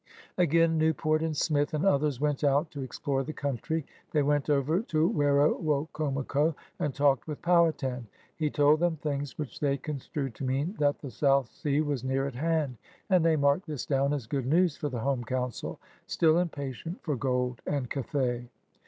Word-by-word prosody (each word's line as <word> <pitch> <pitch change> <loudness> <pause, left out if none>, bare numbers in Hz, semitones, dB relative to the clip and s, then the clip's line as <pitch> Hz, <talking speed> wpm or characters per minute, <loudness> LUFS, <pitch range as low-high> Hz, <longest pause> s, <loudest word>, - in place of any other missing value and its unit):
Again 165 -1 +3
Newport 155 0 +2
and 160 -2 -2
Smith 145 +1 +1
and 155 - 0
others 145 -7 +2
went 150 0 0
out 145 +3 +2
to 140 - -6
explore 135 +1 -2
the 155 +3 -6
coimtry. 145 +4 -2 0.3
They 150 -2 +3
went 145 0 +1
over 150 +5 +2
to 160 -7 +1
Wero 145 -3 +3
wocomoco 150 0 0 0.2
and 145 - 0
talked 140 -1 +2
with 150 -2 -6
Powhatan. 155 -8 +2 0.3
He 155 -2 0
told 145 +1 +4
them 175 -1 +1
things 145 -2 -4
which 150 -4 -6
they 140 -2 +1
construed 140 -2 -4
to 135 - -8
mean 135 +7 -1
that 145 -1 +2
the 140 - -8
South 135 +1 +2
Sea 145 0 -1
was 145 -5 -2
near 135 +1 0
at 140 - -4
hand, 150 -2 -1 0.3
and 180 -3 +5
they 165 -1 +4
marked 140 +5 +2
this 150 -4 -4
down 140 0 +1
as 145 -5 -2
good 130 +2 -2
news 170 +2 +3
for 150 -4 -3
the 125 -4 -4
home 135 -1 0
Coimcil 125 +1 -3 0.2
— - - -35
still 160 0 +3
impatient 160 - -4
for 150 -4 -1
gold 125 -1 -1
and 140 -4 -1
Cathay. 125 -3 -2
145 Hz, 185 wpm, -29 LUFS, 135-155 Hz, 0.3 s, and